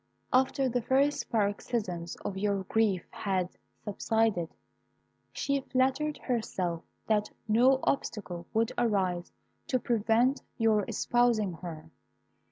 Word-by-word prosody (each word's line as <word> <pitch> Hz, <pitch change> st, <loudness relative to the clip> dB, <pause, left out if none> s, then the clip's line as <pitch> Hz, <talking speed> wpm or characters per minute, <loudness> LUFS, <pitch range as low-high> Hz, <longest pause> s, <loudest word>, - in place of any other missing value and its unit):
"After 265 Hz, +1 st, +3 dB
the 245 Hz, 0 st, 0 dB
first 275 Hz, +5 st, +1 dB
paroxysms 200 Hz, -4 st, -1 dB
of 195 Hz, -, -2 dB
your 200 Hz, 0 st, 0 dB
grief 205 Hz, -3 st, +1 dB
had 185 Hz, -3 st, -1 dB, 0.3 s
subsided, 210 Hz, -4 st, 0 dB, 0.8 s
she 280 Hz, 0 st, 0 dB
flattered 265 Hz, +4 st, +1 dB
herself 185 Hz, -9 st, -2 dB, 0.2 s
that 210 Hz, -1 st, +1 dB, 0.2 s
no 250 Hz, +5 st, +5 dB
obstacle 190 Hz, -10 st, -2 dB
would 225 Hz, +1 st, +1 dB
arise 190 Hz, -7 st, 0 dB, 0.4 s
to 255 Hz, -, +2 dB
prevent 235 Hz, +3 st, +2 dB, 0.2 s
your 220 Hz, -4 st, +3 dB
espousing 235 Hz, -6 st, +2 dB
her. 160 Hz, -2 st, -8 dB
220 Hz, 105 wpm, -30 LUFS, 190-245 Hz, 0.8 s, no